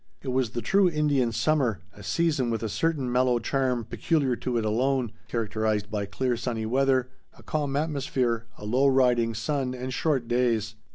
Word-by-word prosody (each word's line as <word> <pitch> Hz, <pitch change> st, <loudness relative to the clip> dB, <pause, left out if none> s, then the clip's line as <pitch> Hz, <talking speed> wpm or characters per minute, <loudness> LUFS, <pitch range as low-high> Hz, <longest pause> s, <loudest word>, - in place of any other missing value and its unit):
It 135 Hz, -, -4 dB
was 130 Hz, -2 st, +1 dB
the 120 Hz, 0 st, -5 dB
true 195 Hz, -, +4 dB
Indian 145 Hz, -6 st, +1 dB
summer, 125 Hz, -, +1 dB
a 105 Hz, -, -13 dB
season 130 Hz, -, 0 dB
with 115 Hz, 0 st, -2 dB
a 110 Hz, -, -1 dB
certain 145 Hz, 0 st, 0 dB
mellow 125 Hz, 0 st, +3 dB
charm 125 Hz, -1 st, 0 dB
peculiar 135 Hz, +1 st, 0 dB
to 125 Hz, -2 st, -2 dB
it 110 Hz, -, 0 dB
alone, 125 Hz, +2 st, +1 dB, 0.2 s
characterized 110 Hz, -3 st, -1 dB
by 100 Hz, -2 st, -2 dB
clear 125 Hz, +5 st, -1 dB
sunny 115 Hz, -2 st, -3 dB
weather, 130 Hz, +1 st, +2 dB, 0.3 s
a -, -, -16 dB
calm 145 Hz, -3 st, -2 dB
atmosphere, 130 Hz, -6 st, -1 dB
a 105 Hz, -, -9 dB
low, 130 Hz, +6 st, +3 dB
riding 125 Hz, -4 st, +3 dB
sun, 130 Hz, +2 st, -1 dB
and 130 Hz, +1 st, -5 dB
short 135 Hz, -4 st, 0 dB
days. 115 Hz, -3 st, +1 dB
125 Hz, 175 wpm, -26 LUFS, 115-135 Hz, 0.3 s, true